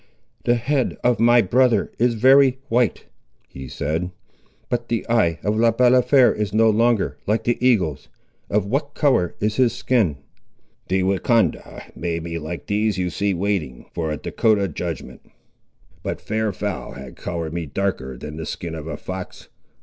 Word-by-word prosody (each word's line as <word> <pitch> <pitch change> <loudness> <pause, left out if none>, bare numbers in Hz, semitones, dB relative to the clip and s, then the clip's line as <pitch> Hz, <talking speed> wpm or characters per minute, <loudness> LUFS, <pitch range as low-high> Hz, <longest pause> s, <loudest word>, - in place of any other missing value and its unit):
"The 120 - +4
head 130 +3 0
of 120 -2 +2
my 120 +1 +5
brother 120 +2 +2
is 120 0 +2
very 130 +3 +5
white," 120 -2 +1 0.4
he 65 0 -9
said; 80 +7 -2 0.6
"but 120 -1 -2
the 115 - -1
eye 105 -9 +2
of 105 +1 0
Le 115 +1 +4
Balafré 125 +2 +4
is 105 -1 -2
no 110 0 +5
longer 115 0 +1
like 110 +2 +1
the 120 +1 -1
eagle's. 95 - +1 0.4
Of 105 -1 +1
what 140 +7 -2
colour 130 - +2
is 105 +1 -1
his 125 -3 +3
skin?" 105 - +1 0.7
"The 95 0 +1
Wahcondah 100 +4 0
made 85 -1 -3
me 85 0 -4
like 80 +2 -6
these 105 0 0
you 90 -1 -1
see 100 +3 0
waiting 85 -10 -2
for 80 -2 -2
a 75 - -2
Dahcotah 100 +4 +1
judgment; 85 +1 -6 0.8
but - - -4
fair 110 +1 -2
and 100 - -3
foul 100 +1 -4
has - - -10
coloured 85 -2 -5
me 85 -2 -3
darker 70 -6 -3
than 75 +4 -8
the 80 - -5
skin 85 -2 -5
of 80 -1 -7
a 80 -2 -5
fox. 95 +2 -8
105 Hz, 165 wpm, -22 LUFS, 85-120 Hz, 0.8 s, my